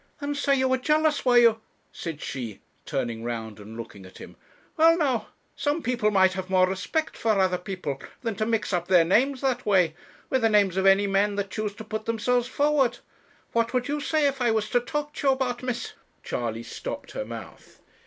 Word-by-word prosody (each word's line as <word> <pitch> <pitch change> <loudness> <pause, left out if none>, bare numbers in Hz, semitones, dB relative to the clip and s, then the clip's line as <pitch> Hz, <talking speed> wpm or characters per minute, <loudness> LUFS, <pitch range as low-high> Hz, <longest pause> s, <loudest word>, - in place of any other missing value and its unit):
'And 290 0 -3
so 285 0 0
you 265 -1 +3
were 260 0 +1
jealous, 305 +1 +2
were 245 -1 +5
you?' 230 -2 +5 0.3
said 165 -3 -6
she, 120 -7 -5 0.3
turning 120 -7 -2
round 115 -3 -5
and 110 +2 -10
looking 105 -4 -9
at 95 - -14
him. - - -11 0.4
'Well 330 0 +5
now, 260 -9 0 0.3
some 295 +2 -1
people 235 -4 +1
might 190 -2 +4
have 185 0 -5
more 185 -1 +4
respect 250 - -2
for 225 -1 +1
other 185 -2 +2
people 180 -8 -5 0.2
than 230 -2 -2
to 215 - 0
mix 225 -3 0
up 175 -1 0
their 180 -3 +5
names 255 +9 +2
that 255 -2 0
way, 185 -6 +3 0.4
with 260 - +2
the 225 - +4
names 205 -4 +3
of 190 0 +2
any 195 +1 +5
men 200 +1 +1
that 200 -1 -3
choose 210 -2 -3
to 220 - -8
put 215 0 -5
themselves 235 +2 +1
forward. 285 -1 +2 0.5
What 230 +2 0
would 250 0 0
you 295 +1 -2
say 310 0 +1
if 275 -2 0
I 240 - +3
was 220 -1 0
to 245 - +4
talk 295 +4 -4
to 285 - -2
you 270 - +6
about 250 -2 -2
Miss 250 -2 -4
' - - -40
Charley - - -3
stopped - - -7
her - - -4
mouth. - - -10
225 Hz, 215 wpm, -26 LUFS, 185-265 Hz, 0.5 s, you